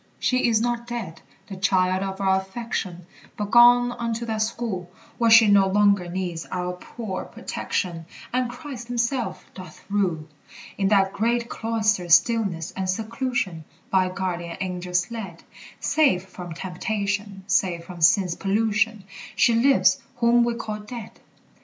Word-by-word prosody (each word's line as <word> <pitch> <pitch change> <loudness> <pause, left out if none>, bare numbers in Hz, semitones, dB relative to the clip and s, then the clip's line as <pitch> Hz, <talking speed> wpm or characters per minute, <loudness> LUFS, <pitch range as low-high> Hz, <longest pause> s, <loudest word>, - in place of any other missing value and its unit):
She 255 -1 +1
is 225 -2 +3
not 240 0 -2
dead, 225 -10 -6 0.2
the 195 - -8
child 185 -1 +1
of 195 0 -4
our 190 -1 +2
affection, 190 -4 -5 0.3
But 205 -1 -4
gone 245 0 +7
unto 235 -1 -3
that 220 -2 -2
school 215 -5 -3 0.3
Where 230 -1 +3
she 225 -1 +8
no 200 -1 +5
longer 200 -2 +3
needs 175 -2 -4
our 180 0 -3
poor 190 +1 -6
protection, 165 -3 -4 0.3
And 250 -1 0
Christ 250 -2 -8
himself 245 +1 -2
doth 185 -1 -12
rule. 180 -7 0 0.5
In 195 - 0
that 195 -1 +3
great 235 +2 0
cloister's 215 -6 +2
stillness 200 -9 0
and 190 -1 -4
seclusion, 220 -4 -2 0.3
By 185 -1 +3
guardian 175 -2 -4
angels 180 +1 -2
led, 195 -8 -7 0.4
Safe 230 -13 +2
from 180 -2 -9
temptation, 200 +2 -3
safe 185 -3 0
from 180 -2 -10
sin's 180 +1 +4
pollution, 210 +2 0 0.3
She 235 - +4
lives 230 -6 +4
whom 240 0 +4
we 235 0 0
call 215 -2 -5
dead. 220 +2 -8
200 Hz, 140 wpm, -24 LUFS, 185-235 Hz, 0.5 s, she